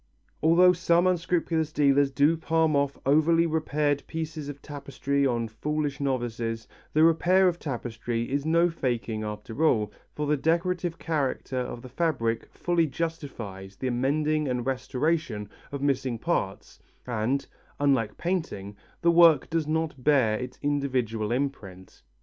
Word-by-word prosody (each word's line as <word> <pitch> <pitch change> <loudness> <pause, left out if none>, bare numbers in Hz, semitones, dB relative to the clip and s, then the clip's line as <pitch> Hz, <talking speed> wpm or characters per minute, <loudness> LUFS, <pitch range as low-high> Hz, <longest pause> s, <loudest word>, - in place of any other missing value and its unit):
Although 175 +3 +6
some 170 0 +2
unscrupulous 170 -3 0
dealers 140 -1 +3
do 140 +4 +3
palm 160 -1 +1
off 140 0 +1
over 155 +4 +4
repaired 150 -3 +1
pieces 160 -2 -5
of 140 -1 -7
tapestry 140 -1 -2
on 120 -2 -1
foolish 145 +6 -3
novices, 120 -4 -2 0.2
the 155 - +4
repair 180 +3 +4
of 175 -1 0
tapestry 120 -3 -3
is 140 0 0
no 170 +2 +3
faking 120 -8 -2
after 105 +6 -4
all, 110 -9 +2 0.2
for 150 - -2
the 150 +1 +2
decorative 170 +3 0
character 140 -4 -2
of 125 -1 -5
the - - -8
fabric 125 -6 -1
fully 170 -2 +1
justifies 130 - -5
the 130 +4 -2
mending 150 +4 +1
and 125 -2 -2
restoration 130 -3 -1 0.2
of 140 -1 -4
missing 135 -4 0
parts 110 - -3 0.3
and, 125 +3 -1 0.3
unlike 130 -7 +1
painting, 160 - -3 0.3
the 170 - +5
work 165 -4 +5
does 160 -2 0
not 155 -4 -2
bear 130 -7 +4
an 125 0 -4
individual 130 -7 -1
imprint. 115 -9 -4
140 Hz, 140 wpm, -27 LUFS, 120-160 Hz, 0.3 s, Although